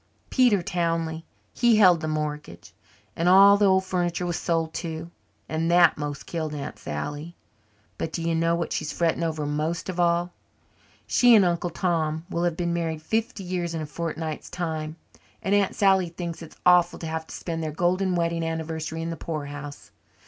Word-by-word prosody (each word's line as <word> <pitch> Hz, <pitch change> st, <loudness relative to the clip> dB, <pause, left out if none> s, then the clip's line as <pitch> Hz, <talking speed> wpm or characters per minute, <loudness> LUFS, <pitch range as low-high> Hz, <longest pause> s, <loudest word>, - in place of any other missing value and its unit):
"Peter 240 Hz, -8 st, +4 dB
Townley. 165 Hz, -3 st, -1 dB, 0.3 s
He 240 Hz, -2 st, +4 dB
held 180 Hz, -6 st, +6 dB
the 155 Hz, -, -3 dB
mortgage. 150 Hz, -, -4 dB, 0.4 s
And 170 Hz, +2 st, +2 dB
all 195 Hz, +2 st, +8 dB
the 205 Hz, 0 st, +3 dB
old 190 Hz, 0 st, +3 dB
furniture 180 Hz, -1 st, -1 dB
was 175 Hz, -1 st, -1 dB
sold 165 Hz, -1 st, -1 dB
too, 165 Hz, 0 st, -5 dB, 0.4 s
and 160 Hz, +1 st, -1 dB
that 175 Hz, -1 st, +6 dB
most 145 Hz, -2 st, -5 dB
killed 155 Hz, -3 st, -4 dB
Aunt 140 Hz, -, -6 dB
Sally. 145 Hz, -, -5 dB, 0.6 s
But 160 Hz, -, -3 dB
do 165 Hz, -, -4 dB
you 165 Hz, 0 st, 0 dB
know 165 Hz, +1 st, +2 dB
what 170 Hz, 0 st, -2 dB
she's 155 Hz, -1 st, -2 dB
fretting 170 Hz, 0 st, 0 dB
over 160 Hz, -2 st, -1 dB
most 155 Hz, +5 st, -2 dB
of 180 Hz, -1 st, -4 dB
all? 175 Hz, 0 st, +2 dB, 0.7 s
She 245 Hz, -2 st, +5 dB
and 205 Hz, -3 st, +6 dB
Uncle 175 Hz, 0 st, 0 dB
Tom 160 Hz, -2 st, -1 dB
will 170 Hz, +1 st, 0 dB
have 170 Hz, -2 st, -1 dB
been 170 Hz, -1 st, -1 dB
married 165 Hz, -2 st, -2 dB
fifty 220 Hz, +2 st, -2 dB
years 175 Hz, -2 st, -3 dB
in 160 Hz, -, -3 dB
a -, -, -4 dB
fortnight's 160 Hz, 0 st, -5 dB
time 160 Hz, -3 st, -4 dB, 0.5 s
and 195 Hz, -, 0 dB
Aunt 205 Hz, -2 st, +2 dB
Sally 190 Hz, -3 st, +3 dB
thinks 170 Hz, 0 st, -6 dB
it's 165 Hz, -, -11 dB
awful 180 Hz, -1 st, +5 dB
to -, -, -7 dB
have 160 Hz, 0 st, -4 dB
to -, -, -8 dB
spend 165 Hz, -2 st, -4 dB
their 160 Hz, -, -2 dB
golden 180 Hz, +4 st, +1 dB
wedding 170 Hz, -1 st, 0 dB
anniversary 160 Hz, 0 st, -3 dB
in 165 Hz, -, -3 dB
the 165 Hz, -, -5 dB
poorhouse. 145 Hz, -2 st, -6 dB
170 Hz, 185 wpm, -25 LUFS, 160-180 Hz, 0.7 s, all